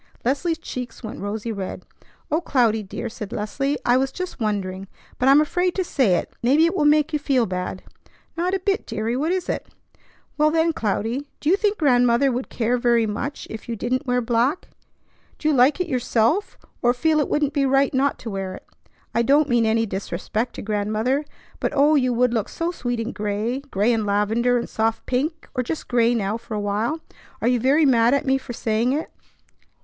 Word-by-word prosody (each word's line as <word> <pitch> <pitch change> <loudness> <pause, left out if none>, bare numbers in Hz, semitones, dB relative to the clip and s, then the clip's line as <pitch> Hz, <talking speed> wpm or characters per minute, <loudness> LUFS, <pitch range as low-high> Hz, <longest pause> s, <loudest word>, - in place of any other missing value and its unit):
Leslie's 290 +6 0
cheeks 250 -6 -7
went 220 - -6
rosy 210 +3 -4
red. 195 -3 -5 0.5
"O 315 +3 +2
Cloudy, 235 -9 +2
dear," 210 +4 -6
said 220 -3 -7
Leslie, 275 +7 -2
"I 245 +1 +4
was 265 +1 0
just 365 -1 -6
wondering. 195 -3 -2 0.3
But 255 - +4
I'm 275 +2 +7
afraid 355 +4 +1
to 375 - +1
say 255 - +2
it. - - -3
Maybe 280 +7 +4
it 335 +3 0
will 300 - +2
make 300 +1 +3
you 300 - +1
feel 270 -4 +2
bad." 185 -1 -4 0.5
"Not 355 +3 0
a - - -1
bit, 390 +3 -1
deary; 220 +2 -2
what 305 +6 0
is 370 -1 -1
it?" - - -3 0.7
"Well, 305 0 +5
then, 325 +1 +2
Cloudy, 230 +3 -2
do 295 - -1
you - - +6
think 415 0 0
Grandmother 250 -2 +3
would 250 +1 -3
care 245 +1 0
very 235 -2 +3
much 235 +7 -4
if 220 +2 -8
you 230 - -2
didn't 255 +5 -2
wear 250 0 +2
black? 240 +6 0 0.7
Do 305 - -2
you - - +3
like 265 +5 +4
it 360 - -1
yourself, 250 - +1 0.2
or 240 +1 +3
feel 310 +5 +2
it 295 - 0
wouldn't 295 -1 +1
be 275 -2 +2
right 270 +1 +3
not 275 +1 +1
to 225 - -5
wear 190 -1 -4
it? - - -13 0.5
I 235 - +2
don't 285 +5 +4
mean 235 -2 +3
any 225 +1 +2
disrespect 200 +4 -3
to - - -6
Grandmother; 215 +7 0 0.3
but - - -1
oh, 290 +2 +5
you 255 -4 +3
would 245 0 +2
look 225 -4 -1
so 335 +1 -2
sweet 245 -7 -3
in 230 +1 -3
gray, 210 +5 -2
gray 240 -5 0
and 220 -2 -1
lavender 220 +5 +2
and 235 - -3
soft 225 0 -1
pink, 305 +6 -2
or 255 - 0
just 300 +6 -4
gray 240 -1 +3
now 210 -1 -1
for 230 -1 -7
a - - -1
while. 210 +10 -1 0.4
Are - - 0
you 245 0 +3
very 280 +6 +4
mad 240 -1 +4
at 280 - -1
me 270 0 +2
for 260 - -9
saying 230 +2 0
it?" 305 +3 -3
245 Hz, 205 wpm, -23 LUFS, 225-290 Hz, 0.7 s, I'm